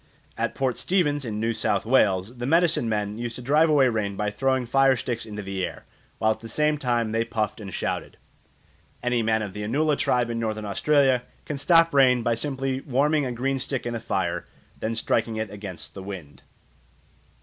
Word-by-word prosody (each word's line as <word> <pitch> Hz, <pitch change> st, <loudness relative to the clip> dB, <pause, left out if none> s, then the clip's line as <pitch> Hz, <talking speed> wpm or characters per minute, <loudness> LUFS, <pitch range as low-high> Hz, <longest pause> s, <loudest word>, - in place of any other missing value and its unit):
At -, -, -2 dB
Port 130 Hz, -3 st, -1 dB
Stevens 145 Hz, -7 st, +1 dB
in 105 Hz, -2 st, -3 dB
New 115 Hz, +1 st, 0 dB
South 100 Hz, -2 st, 0 dB
Wales 110 Hz, -2 st, +2 dB
the 120 Hz, -, -2 dB
medicine 165 Hz, -6 st, +3 dB
men 105 Hz, 0 st, -2 dB
used 120 Hz, -1 st, -4 dB
to -, -, -7 dB
drive 150 Hz, +5 st, +4 dB
away 140 Hz, -4 st, +5 dB
rain 105 Hz, -4 st, -1 dB
by 105 Hz, +1 st, -1 dB
throwing 130 Hz, +3 st, 0 dB
fire 135 Hz, +2 st, +4 dB
sticks 120 Hz, -1 st, -3 dB
into 105 Hz, -1 st, -6 dB
the 95 Hz, -1 st, -3 dB
air, -, -, -5 dB, 0.3 s
while 110 Hz, -, +2 dB
at -, -, -3 dB
the 115 Hz, -, -9 dB
same 150 Hz, +5 st, +1 dB
time 120 Hz, -4 st, 0 dB
they 115 Hz, +1 st, +1 dB
puffed 110 Hz, -2 st, -2 dB
and 100 Hz, -2 st, -7 dB
shouted. -, -, -3 dB, 0.9 s
Any 125 Hz, -1 st, +1 dB
man 110 Hz, 0 st, +1 dB
of 100 Hz, -2 st, -6 dB
the 105 Hz, -, -6 dB
Anula 145 Hz, +8 st, +1 dB
tribe 120 Hz, -3 st, +1 dB
in 115 Hz, -, -2 dB
Northern 110 Hz, -2 st, -2 dB
Australia 130 Hz, +5 st, +3 dB, 0.2 s
can 150 Hz, -, -4 dB
stop 165 Hz, +2 st, +5 dB
rain 130 Hz, -3 st, +5 dB
by 120 Hz, -, +2 dB
simply 135 Hz, +1 st, -2 dB
warming 145 Hz, +2 st, +1 dB
a -, -, -3 dB
green 135 Hz, +3 st, -1 dB
stick 130 Hz, 0 st, -3 dB
in 120 Hz, -, -2 dB
the 115 Hz, -, -3 dB
fire, -, -, -1 dB, 0.4 s
and -, -, -28 dB
then 115 Hz, +1 st, -1 dB
striking 115 Hz, 0 st, 0 dB
it 110 Hz, -2 st, -3 dB
against 100 Hz, -4 st, -8 dB
the 95 Hz, -, -8 dB
wind. 95 Hz, -7 st, -8 dB
120 Hz, 205 wpm, -25 LUFS, 110-135 Hz, 0.9 s, away